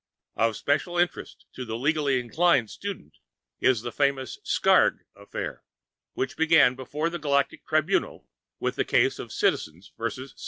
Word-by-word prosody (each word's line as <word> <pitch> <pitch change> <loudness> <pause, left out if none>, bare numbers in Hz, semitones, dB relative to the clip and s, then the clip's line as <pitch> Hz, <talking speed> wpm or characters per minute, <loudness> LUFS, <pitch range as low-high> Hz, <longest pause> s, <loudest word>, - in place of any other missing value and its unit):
Of 115 -1 +1
special 155 +5 0
interest 175 0 -2
to 130 - -6
the 110 -2 -4
legally 140 0 +1
inclined 125 -1 +2
student 195 - -7 0.4
is 125 -4 +2
the 120 - -4
famous 135 -1 -1
Skrrgck - - +3
Affair, 100 0 -6 0.5
which 130 -1 -2
began 160 -5 +5
before 145 +6 -3
the 175 - -4
Galactic 140 -2 0
Tribunal - - 0 0.3
with - - -2
the - - +2
case - - +2
of - - -7
_Citizens 80 +5 -1
vs. 130 +4 -4
135 Hz, 145 wpm, -26 LUFS, 120-155 Hz, 0.5 s, began